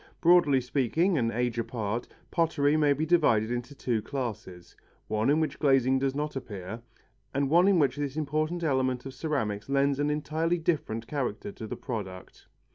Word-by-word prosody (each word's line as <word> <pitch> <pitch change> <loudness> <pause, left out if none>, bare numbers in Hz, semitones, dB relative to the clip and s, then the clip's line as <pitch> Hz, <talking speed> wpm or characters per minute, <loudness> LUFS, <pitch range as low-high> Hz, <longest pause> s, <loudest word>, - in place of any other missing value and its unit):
Broadly 165 -6 +5
speaking, 145 - +1
and 115 -1 +1
age 120 0 -1
apart, 115 -1 -3 0.2
pottery 155 -4 +2
may 150 -2 +3
be 145 +3 +1
divided 120 -10 +3
into 120 +3 -4
two 120 -5 -1
classes: 110 -9 -6 0.3
one 110 +3 0
in 150 +2 +4
which 155 - -2
glazing 135 -2 +3
does 135 0 -1
not 150 0 -3
appear, 110 -4 -6 0.5
and 140 0 0
one 175 +3 +5
in 200 -2 +4
which 145 -4 +2
this 145 -1 -3
important 155 +3 -1
element 130 -4 0
of 135 - -7
ceramics 125 -7 -2
lends 140 0 +2
an 145 0 +1
entirely 155 +3 0
different 155 -10 -1
character 120 -7 -3
to 110 - -8
the - - -5
product. 95 -6 -7
135 Hz, 170 wpm, -28 LUFS, 115-155 Hz, 0.5 s, Broadly